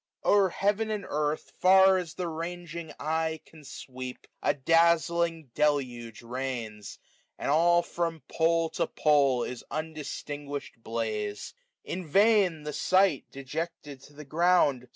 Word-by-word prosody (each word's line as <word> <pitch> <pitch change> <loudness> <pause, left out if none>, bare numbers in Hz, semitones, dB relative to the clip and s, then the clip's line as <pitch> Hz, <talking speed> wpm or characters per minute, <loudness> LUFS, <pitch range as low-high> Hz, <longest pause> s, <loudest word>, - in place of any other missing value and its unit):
O'er 200 -2 +5
heaven 205 +4 0
and 210 -2 -3
earth, 150 +1 -2
far 190 0 +6
as 175 -3 -7
die 185 - -4
ranging 170 0 -5
eye 160 +1 -1
Can 155 -2 -16
sweep, 130 -2 -8 0.2
a - - +1
dazling 165 0 +2
deluge 125 -7 -1
reigns; 120 -4 -5 0.4
and - - -1
all 175 +3 +4
435 - - -17 0.3
From - - -16
pole 165 0 +3
to - - -1
pole 140 -5 +3
is 125 - -6
undistinguish'd 145 -3 -6
bla2e« 110 -2 -3 0.3
In 180 -2 -5
vain 195 -3 +3
the 150 0 -5
sight, 185 -5 +2
dejected 145 0 -6
to 145 - -16
the 150 +1 -11
ground. 150 -5 +2
155 Hz, 130 wpm, -28 LUFS, 135-170 Hz, 0.4 s, far